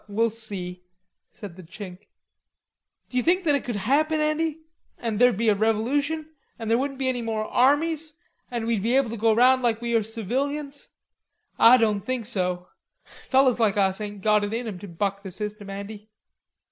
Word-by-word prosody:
"We'll 225 +2 +1
see," 195 -5 -3 0.5
said 195 -5 -10
the - - -9
Chink. 185 +2 -10 1.0
"D'you 250 0 0
think 360 +5 +2
it 285 -3 +2
could 240 - -4
happen, 295 +10 +1
Andy, 305 +1 0 0.4
that 225 -3 -2
there'd 245 -4 +5
be 225 0 +2
a - - +5
revolution, 265 +9 0 0.3
an' 225 -2 -5
there 230 - +4
wouldn't 275 0 -3
be 265 -1 -1
any 250 -2 -1
more 220 -1 -2
armies, 300 +5 +2 0.3
an' 235 -2 -3
we'd 225 -3 0
be 235 +5 +1
able 265 -4 +2
to - - -4
go 225 +1 +3
round 255 +3 +5
like 230 -2 +1
we 235 0 -3
are 230 - +4
civilians? 275 +7 -3 0.7
Ah 240 +2 +8
doan 215 -4 +1
think 245 +2 -3
so. 180 -5 -2 0.5
Fellers 260 -2 +3
like 215 -2 +2
us 195 0 +1
ain't 205 -2 -7
got 210 -1 +3
it 205 +2 -2
in 235 0 -3
'em 195 -5 -6
to 205 - -9
buck 200 +3 -2
the 195 - -7
system, 210 +2 -6
Andy." 205 +2 -8
225 Hz, 185 wpm, -25 LUFS, 205-260 Hz, 1.0 s, Ah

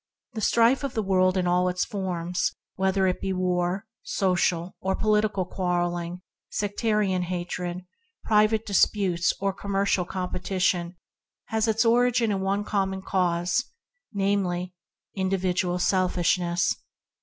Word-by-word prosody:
The 220 - -4
strife 235 +6 +3
of 275 - -3
the 220 - 0
world 185 -1 +2
in 180 - +1
all 180 +1 +2
its 180 0 -1
forms, 180 -3 -2 0.2
whether 190 0 +1
it 185 -1 0
be 195 - -1
war, 180 +2 0 0.2
social 180 -2 0
or 190 0 0
political 210 -3 +1
quarrel 175 -1 -1
ing, 175 +1 -6 0.3
sectarian 205 -2 0
hatred, 180 0 -4 0.4
private 215 +1 +3
disputes, 190 -3 +2
or 195 0 0
commercial 195 -2 0
competiton, 180 -1 -1 0.5
has 220 0 +1
its 220 +2 +2
origin 235 -1 +3
in 195 -1 -1
a 200 +2 0
common 190 -2 -1
cause, 180 +2 +1 0.5
namely, 195 -3 -1 0.4
individual 185 -2 0
selfishness. 180 -1 +1
190 Hz, 120 wpm, -26 LUFS, 180-205 Hz, 0.5 s, strife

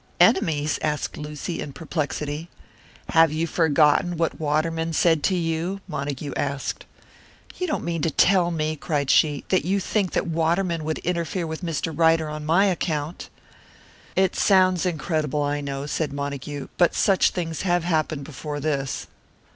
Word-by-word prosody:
"Enemies?" 150 - +3
asked 150 -1 -2
Lucy, 150 +3 -5
in 140 - -6
perplexity. 155 0 -3 0.6
"Have 165 -1 +5
you 160 +2 0
forgotten 160 +1 +3
what 165 0 -1
Waterman 160 +2 0
said 160 -1 +3
to 190 - +2
you?" 170 +3 -1
Montague 140 -3 -4
asked. 140 -1 -3 0.7
"You 365 - -1
don't 305 - -2
mean 170 -1 -2
to 165 - +1
tell 180 +3 +4
me," 155 -2 -1
cried 145 -2 -1
she, 150 -2 +3
"that 185 - +2
you 195 +3 +1
think 195 -1 -1
that - - +1
Waterman 165 +1 0
would 160 0 -1
interfere 170 0 -1
with 160 +1 -5
Mr. 165 -1 -2
Ryder 165 -1 +3
on 150 0 -6
my 175 +5 +4
account." 165 -4 -2 0.9
"It 190 -1 +2
sounds 185 -2 +4
incredible, 155 -3 -1
I 145 0 -1
know," 140 0 -4
said 150 0 -2
Montague, 140 0 -5
"but 175 - +4
such 195 -2 +4
things 165 -3 -4
have 175 -2 +1
happened 155 -4 0
before 145 +1 -6
this. 140 -2 -2
160 Hz, 155 wpm, -24 LUFS, 150-175 Hz, 0.9 s, Have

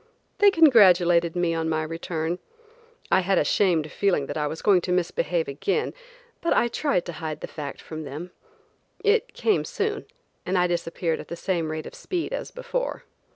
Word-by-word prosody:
They 410 - +7
congratulated 180 - +5
me 175 -1 +1
on 165 0 -1
my 155 0 0
return. 165 +1 -3 0.7
I - - +6
had 190 0 +1
a - - +4
shamed 165 -6 +2
feeling 185 -8 +1
that - - -6
I 150 -1 0
was 160 +2 -6
going 195 -4 +5
to 180 - -3
misbehave 475 - 0
again, 420 - -1 0.5
but 335 - +2
I 240 - +3
tried 270 - 0
to 175 - -5
hide 155 -1 -4
the - - -3
fact 145 -3 -7
from 155 -1 -7
them. 155 +5 -7 0.7
It 445 +2 +2
came 430 - +2
soon, 425 0 -3 0.4
and 185 +1 0
I 180 - +4
disappeared 170 -1 -1
at - - -9
the 170 - -5
same 170 -3 -1
rate 155 0 -4
of - - -9
speed 360 +5 -4
as - - -4
before. - - -4
180 Hz, 185 wpm, -25 LUFS, -, 0.7 s, They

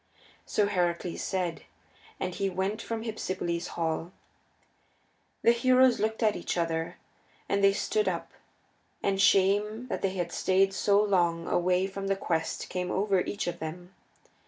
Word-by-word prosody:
So 210 - +2
Heracles 175 -3 -1
said, 180 -4 -2 0.6
and 185 -1 -2
he 195 +1 -1
went 190 +4 -2
from 225 -1 -4
Hypsipyle's 185 -6 -3
hall. 165 +1 -1 1.3
The 230 - +7
heroes 255 +1 +4
looked 220 +2 -1
at 215 -1 +3
each 175 - -3
other, 165 -1 -1 0.5
and 200 0 0
they 195 0 +6
stood 425 - 0
up, - - -2 0.7
and 195 -1 +1
shame 205 +4 +3
that - - -3
they 195 -1 -1
had 175 -2 -2
stayed 195 +2 +2
so 200 +1 +3
long 175 -5 +2
away 180 +1 +2
from 195 0 -5
the 195 - +2
quest 165 -4 -2
came 180 0 -3
over 195 -1 +1
each 205 - -3
of 175 - -4
them. 175 +4 -7
190 Hz, 150 wpm, -29 LUFS, 175-205 Hz, 1.3 s, The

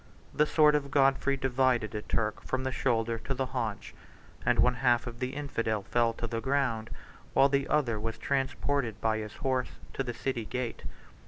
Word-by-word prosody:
The 150 - +3
sword 150 -1 +5
of 145 -2 0
Godfrey 135 0 +3
91 135 - -11
divided 125 -4 +2
a 105 - -3
Turk 110 0 -1
from 130 0 -2
the 130 - -1
shoulder 115 -3 0
to 135 - -3
the 130 +1 0
haunch; 115 -5 -4 0.5
and - - +2
one 125 - +5
half 120 -1 +2
of 120 0 -7
the 130 +1 -3
infidel 115 -7 -2
fell 120 +1 +2
to 115 - -5
the 115 0 -3
ground, 125 -4 0 0.5
while 135 +1 +6
the 140 -1 +1
other 130 -7 +1
was 115 +1 -3
transported 135 -4 -1
by 110 -1 +1
his 105 -1 -7
horse 130 -2 -1 0.2
to 135 - -1
the 120 -2 -4
city 120 -3 -2
gate. 125 0 -4
125 Hz, 190 wpm, -30 LUFS, 115-135 Hz, 0.5 s, while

